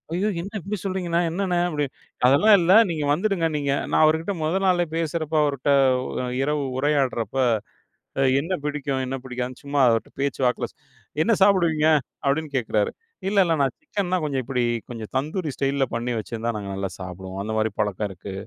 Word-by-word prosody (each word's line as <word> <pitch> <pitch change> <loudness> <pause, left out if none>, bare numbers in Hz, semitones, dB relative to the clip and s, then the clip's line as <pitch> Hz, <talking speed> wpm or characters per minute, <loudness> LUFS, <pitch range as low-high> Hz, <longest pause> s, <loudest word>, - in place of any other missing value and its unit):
"ஐயோ! 205 +4 +1
என்ன 195 - -7
இப்டி 200 +1 -4
சொல்றிங்கண்ணா? 180 -3 0
என்னண்ணே?" 180 -1 0
அப்டி 150 -3 -1 0.4
அதெல்லாம் 185 +11 +6
இல்ல 170 +2 +3 0.2
நீங்க 155 -2 -2
வந்துடுங்க 180 -1 +1
நீங்க 140 -1 -1 0.2
நான் - - +4
அவருகிட்ட 160 +5 +1
மொத 160 +4 0
நாளே 180 -2 +3
பேசுறப்ப 160 -1 -2
அவர்ட்ட 140 -1 -1 0.7
இரவு 150 0 0
உரையாடுறப்ப 135 -6 0 1.1
என்ன 165 +6 -3
பிடிக்கும்? 140 -2 -2
என்ன 130 - -3
பிடிக்காதுன்னு 125 0 -5
சும்மா 140 0 -1
அவர்ட்ட 115 -1 0
பேச்சு 140 -1 -1
வாக்குல 125 -1 -1 0.6
"என்ன 230 - +2
சாப்பிடுவீங்க?" 170 -6 +3 0.4
அப்டின்னு 145 0 0
கேட்குறாரு 110 -3 0 0.4
இல்ல, 205 - 0
இல்ல 165 - +2
நான் 135 - +1
சிக்கன்னா 200 - -2
கொஞ்சம் 140 -3 -1
இப்டி 125 0 -1 0.3
கொஞ்சம் 115 -3 -7
தந்தூரி 155 +5 -1
ஸ்டைல்ல 135 0 +1
பண்ணி 120 +1 -2
வச்சிருந்தா 115 +1 -3
நாங்க 100 -2 -5
நல்லா 95 0 -3
சாப்பிடுவோம் 95 +1 -7
அந்த 105 +2 -4
மாரி 110 0 +2
பழக்கம் 105 0 0
இருக்கு. 95 +1 -9
145 Hz, 160 wpm, -24 LUFS, 125-170 Hz, 1.1 s, அதெல்லாம்